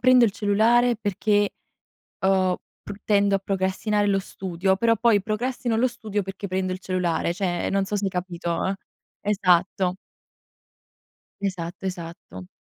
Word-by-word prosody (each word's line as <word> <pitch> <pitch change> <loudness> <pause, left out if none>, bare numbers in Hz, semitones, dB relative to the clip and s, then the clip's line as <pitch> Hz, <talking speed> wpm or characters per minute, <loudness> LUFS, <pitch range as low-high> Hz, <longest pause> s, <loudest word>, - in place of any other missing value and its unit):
prendo 255 -1 +6
il 225 - +3
cellulare 225 +4 +3
perché, 205 -1 +1 0.7
ehm, 190 -1 +3 0.3
pr 205 0 -9
tendo 200 -1 +3
a 195 - 0
procrastinare 195 +2 0
lo 195 -1 +3
studio, 190 -1 -1
però 230 +2 +3
poi, 225 -2 +4
procrastino 235 +3 -1
lo 230 +3 +3
studio 210 -4 -3
perché 195 +1 -6
prendo 185 0 -1
il 185 - -6
cellulare, 175 -3 -1
cioè, 180 -3 -1
non 195 0 +1
so 205 - -3
se 200 - -1
hai 195 - +1
capito, 175 -2 -3
eh. 195 - 0 0.5
Esatto. 185 -2 +2 1.4
Esatto, 185 -1 -4
esatto. 165 - -7
195 Hz, 145 wpm, -24 LUFS, 185-210 Hz, 1.4 s, prendo